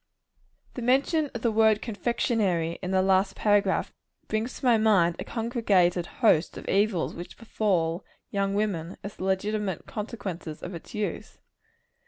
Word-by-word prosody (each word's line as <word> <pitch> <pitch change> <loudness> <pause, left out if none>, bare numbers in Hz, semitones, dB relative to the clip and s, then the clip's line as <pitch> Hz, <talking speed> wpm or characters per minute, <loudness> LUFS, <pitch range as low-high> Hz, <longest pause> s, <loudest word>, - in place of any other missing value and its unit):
The 250 - -6
mention 275 +5 +2
of 235 - -5
the 235 - +2
word 220 -1 +4
confectionary, 205 -7 -1
in 180 - -4
the 190 0 +2
last 190 +1 +2
paragraph, 205 -1 +2 0.3
brings 220 +3 -2
to - - -7
my 245 -2 +6
mind 200 -6 +3
a - - -3
congregated 200 -7 +1 0.2
host 160 -6 +4
of - - -9
evils 195 -3 +1
which 175 - -9
befall 185 -7 0 0.3
young 195 0 0
women, 190 -5 -2
as 200 - -7
the 185 - -4
legitimate 195 -1 -1
consequences 190 -7 -6
of 180 - -5
its 170 +7 -9
use. 205 -5 -4
205 Hz, 150 wpm, -27 LUFS, 180-220 Hz, 0.3 s, my